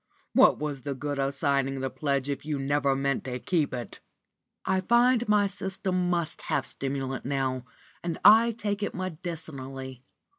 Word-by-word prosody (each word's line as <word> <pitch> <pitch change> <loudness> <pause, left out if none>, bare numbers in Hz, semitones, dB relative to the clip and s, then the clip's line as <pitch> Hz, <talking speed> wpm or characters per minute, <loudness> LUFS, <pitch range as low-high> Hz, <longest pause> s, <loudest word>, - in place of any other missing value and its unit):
What - - +6
was 145 -3 -4
the 140 +2 -4
good 145 +1 -3
of 135 0 +1
signing 140 -2 0
the 130 0 -2
pledge 140 -2 -1
if 140 -1 -3
you 150 -1 -2
never 140 0 +1
meant 140 0 0
to 125 -1 -3
keep 155 +3 0
it?" 120 -2 -6 0.7
"I 190 0 +1
find 240 +3 +3
my 210 -1 +4
system 190 -2 -2
must 170 -3 -1
have - - +1
stimulant 135 -1 -3
now, 130 -2 -1 0.4
and 170 -2 -2
I 225 +3 +8
take 210 -3 -3
it 205 - -2
medicinally." 140 -7 -6
145 Hz, 160 wpm, -28 LUFS, 135-185 Hz, 0.7 s, I